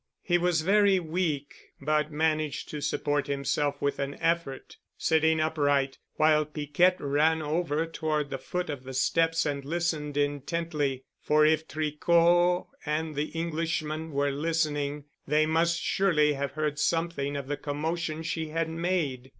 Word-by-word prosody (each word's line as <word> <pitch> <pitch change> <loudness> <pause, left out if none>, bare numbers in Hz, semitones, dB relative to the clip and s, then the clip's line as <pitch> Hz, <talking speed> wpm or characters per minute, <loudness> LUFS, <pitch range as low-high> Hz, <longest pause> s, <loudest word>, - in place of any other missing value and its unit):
He 175 -1 +2
was 175 -2 +2
very 200 +2 +4
weak, 160 -4 -2 0.3
but 150 +1 0
managed 155 -2 -1
to 150 - -5
support 145 0 -1
himself 140 +1 -1
with 140 - -1
an 140 0 -2
effort, 165 -5 -2 0.2
sitting 160 0 +2
upright, 145 -3 +1 0.2
while 155 0 +4
Piquette 150 +5 +1
ran 155 +3 +2
over 160 0 0
toward 155 -3 -2
the 135 - -3
foot 180 +5 -3
of 140 -3 -7
the 130 0 -8
steps 165 +4 +2
and 140 -1 -2
listened 155 -2 -2
intently, 145 -1 -1 0.2
for 150 0 +3
if 155 0 +2
Tricot 170 +4 +2 0.2
and 155 0 -2
the 145 +1 -1
Englishman 160 -1 -2
were 140 0 +1
listening, 145 -1 -1 0.2
they 150 +2 +3
must 165 +2 +2
surely 155 -7 +2
have 140 -1 -3
heard 150 -1 -2
something 165 -3 0
of 140 - -5
the 145 - -1
commotion 155 +2 -3
she 160 -1 -2
had 165 +1 -2
made. 160 -7 -2
155 Hz, 145 wpm, -28 LUFS, 145-165 Hz, 0.3 s, very